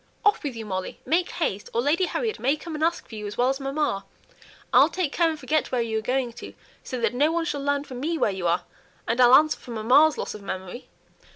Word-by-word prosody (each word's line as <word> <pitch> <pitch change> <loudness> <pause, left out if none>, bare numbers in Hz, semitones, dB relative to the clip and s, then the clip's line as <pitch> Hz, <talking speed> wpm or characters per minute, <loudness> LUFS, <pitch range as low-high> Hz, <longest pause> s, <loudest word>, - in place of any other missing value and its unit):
Off 415 - +4
with 280 -5 -4
you, 225 -1 -6
Molly. 185 -2 -4
Make 350 +3 +1
haste, 205 - -2
or 235 - +3
Lady 305 +8 +2
Harriet 455 -3 -2
may 270 +4 +2
come 325 +2 -8
and 305 0 -3
ask 335 +1 0
for - - -15
you 210 -1 -5
as 205 - -7
well 245 +1 +3
as 270 +1 -1
mamma. 275 -7 -1 0.7
I'll - - +7
take 360 -7 -2
care 335 -1 +3
and 315 -1 -4
forget 310 0 0
where 250 -2 +1
you 220 -1 -1
are - - -6
going 250 +1 -1
to, - - -9 0.3
so 255 - -5
that 230 -1 +1
no 290 +5 +2
one 335 0 0
shall 290 -4 -2
learn 285 0 0
from 255 -4 -8
me 325 +5 -1
where 215 - +2
you 190 -2 -2
are, 170 +2 +1 0.4
and 235 +2 +1
I'll 245 +1 +8
answer 310 +2 +4
for - - -15
mamma's 250 +8 +4
loss - - -4
of 210 - -9
memory." 190 +4 -6
270 Hz, 255 wpm, -25 LUFS, 225-310 Hz, 0.7 s, I'll